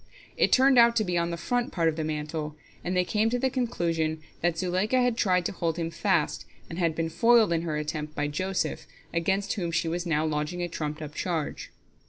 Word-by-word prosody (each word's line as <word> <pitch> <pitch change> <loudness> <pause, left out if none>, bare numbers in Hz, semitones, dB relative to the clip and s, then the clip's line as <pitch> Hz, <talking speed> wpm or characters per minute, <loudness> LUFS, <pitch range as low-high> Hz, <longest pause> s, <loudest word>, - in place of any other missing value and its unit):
It - - +2
turned 260 -1 +6
out 235 0 +6
to 215 - +3
be 180 -3 -2
on 170 0 +1
the 170 - -3
front 245 - -1
part 165 -3 +1
of 160 - +1
the 160 - -2
mantle, 150 0 -3 0.3
and 180 +1 -1
they 180 - +4
came 215 +4 +1
to 245 - 0
the 260 +1 0
conclusion 170 - -1 0.2
that 175 -1 +1
Zuleika 185 +8 +1
had 245 -2 +2
tried 180 -5 +2
to - - 0
hold 165 -3 -2
him 165 -1 -2
fast, - - 0 0.3
and 165 - -5
had 165 -3 +1
been 165 0 -1
foiled 220 +4 +4
in 165 - +1
her 160 -3 -2
attempt 150 0 -4
by 145 - 0
Joseph, 185 +6 -2 0.3
against 190 +4 0
whom 180 -5 -2
she 165 - 0
was 175 +2 -2
now 155 -1 +1
lodging 155 +3 -2
a - - -1
trumped 155 -2 -4
up 150 -1 -7
charge. 165 -4 -3
170 Hz, 225 wpm, -27 LUFS, 160-195 Hz, 0.3 s, turned